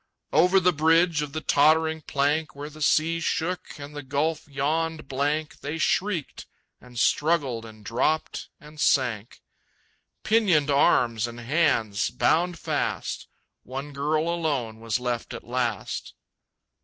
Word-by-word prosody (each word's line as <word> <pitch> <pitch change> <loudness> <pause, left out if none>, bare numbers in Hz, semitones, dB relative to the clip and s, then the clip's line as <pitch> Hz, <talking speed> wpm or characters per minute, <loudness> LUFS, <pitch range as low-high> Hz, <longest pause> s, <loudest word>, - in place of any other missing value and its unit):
Over 180 +5 +5
the 180 0 +3
bridge 165 +1 +3
of 150 -1 -4
the 155 +2 -4
tottering 160 +2 +3
plank, 145 +2 0
Where 145 +2 -7
the 155 +1 -13
sea 160 +2 +2
shook 170 +2 -2
and 145 0 -9
the 145 - -4
gulf 145 +4 -1
yawned 155 +3 -1
blank, 145 +3 -1
They 150 +3 -4
shrieked 175 -1 -1 0.3
and 125 -1 -14
struggled 140 -4 +1
and 110 -1 -13
dropped 130 +8 -1
and 150 -1 -14
sank, 120 -5 +1 0.8
Pinioned 185 -10 +3
arms 120 -4 +3
and 120 0 -9
hands 120 -6 +1
bound 175 +1 +1
fast. - - -3 0.3
One 135 +3 -7
girl 155 +3 0
alone 145 -10 -1
was 115 0 -1
left 125 -1 -3
at - - -8
last. 120 -3 -3
150 Hz, 130 wpm, -25 LUFS, 130-160 Hz, 0.8 s, Over